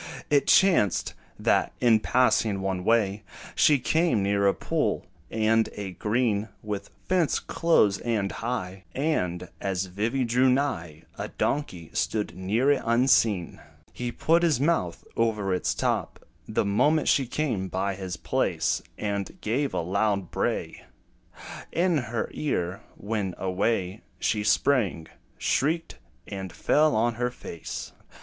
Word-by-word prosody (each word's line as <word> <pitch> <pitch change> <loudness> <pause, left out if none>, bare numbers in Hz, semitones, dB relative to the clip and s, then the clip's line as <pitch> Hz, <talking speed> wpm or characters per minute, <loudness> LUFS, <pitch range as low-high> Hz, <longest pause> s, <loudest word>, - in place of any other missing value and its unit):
It 145 -2 +3
chanced, 170 - +4 0.2
that, - - +1
in 115 -3 +5
passing 110 -4 +2
one 95 -1 -2
way, 105 -2 +2 0.3
She 150 - +5
came 155 - +1
near 100 0 +2
a 100 - +4
pool, - - -1 0.2
and 110 0 +2
a 100 -2 -5
green 110 +1 0
With 105 -2 -4 0.2
fence 180 -4 +2
close 110 -12 +2
and 110 -5 -1
high; 95 -6 -4
And, 90 - -1
as 95 -1 -1
Vivy 110 +8 -1
drew 125 +2 +3
nigh, 125 - -1 0.2
A - - -3
donkey 90 - -2
stood 105 -5 -1
near 110 +9 +1
it 140 - +2
unseen. 115 -6 +2 0.3
He 120 -1 -4
put 165 +7 +2
his 165 -7 +2
mouth 140 - 0
over 110 -4 +1
its 90 - 0
top, - - -2 0.2
The - - 0
moment 135 +10 +2
she 135 -3 +3
came 120 -8 -1
by 95 +2 -1
his 95 -1 -5
place; - - 0 0.2
And 100 -2 -3
gave 130 +6 -1
a - - -1
loud 100 +1 0
bray - - -2 0.9
In 175 -2 +2
her 115 -1 -1
ear, 95 - -2 0.2
when, 100 -3 -3
away 95 +1 -1 0.2
She 105 -2 0
sprang, 105 - +1 0.3
shrieked, 160 +5 0 0.3
and 95 -2 -6
fell 155 - +2
on 115 +2 +2
her 125 - +2
face. 85 -9 -7
110 Hz, 135 wpm, -26 LUFS, 95-130 Hz, 0.9 s, in